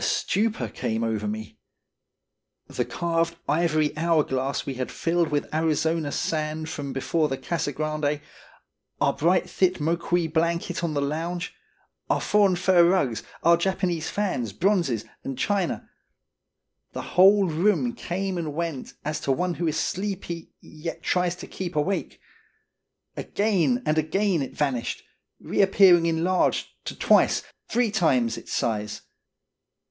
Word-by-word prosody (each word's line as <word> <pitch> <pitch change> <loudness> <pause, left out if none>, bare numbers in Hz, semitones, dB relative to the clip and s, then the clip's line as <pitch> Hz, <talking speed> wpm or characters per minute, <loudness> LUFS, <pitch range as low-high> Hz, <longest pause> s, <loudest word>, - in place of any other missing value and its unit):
A - - -3
stupor 205 - 0
came 110 +2 -2
over 110 -2 -1
me. 110 +1 -6 1.1
The - - -3
carved 170 0 -1
ivory 155 -1 +1
hourglass 150 -4 0
we 135 - -3
had 130 0 -4
filled 170 0 +1
with 145 0 -2
Arizona 160 -1 +1
sand 155 +1 -2
from 140 -3 -5
before 150 +4 0
the 135 - -2
Casa 165 -2 -2
Grande, 150 0 -1 0.8
our - - +3
bright, 175 +4 +2
thick 185 -1 +2
Moqui 170 +2 0
blanket 170 +1 0
on 160 -3 -1
the 140 - +1
lounge, 170 +5 -3 0.6
our - - +2
foreign 205 -3 +3
fur 180 0 +4
rugs, 145 - +2 0.2
our 170 +1 +6
Japanese 175 -2 -1
fans, 155 - -2
bronzes, 170 - +1 0.2
and 135 -2 -5
china 195 +3 -1 1.1
the - - -6
whole 195 +2 +6
room 205 +9 +1
came 190 -4 -3
and 155 -3 -4
went 165 -5 -4
as 150 +1 -2
to 135 - -1
one 175 +6 0
who 170 0 -2
is 155 - 0
sleepy 190 -4 -3
yet 155 +2 -7
tries 180 -1 +1
to 180 - -9
keep 180 -3 -6
awake. 155 +6 -1 1.0
Again 215 +4 +1
and 155 +1 +2
again 175 +2 +1
it 135 - -5
vanished, 135 -5 -1 0.4
re - - 0
appearing 190 -3 +6
enlarged 170 +3 +1 0.2
to - - -4
twice, - - +3 0.2
three 240 -3 +1
times, 135 - +2
its - - -10
size. 105 -2 -2
165 Hz, 140 wpm, -25 LUFS, 145-180 Hz, 1.1 s, our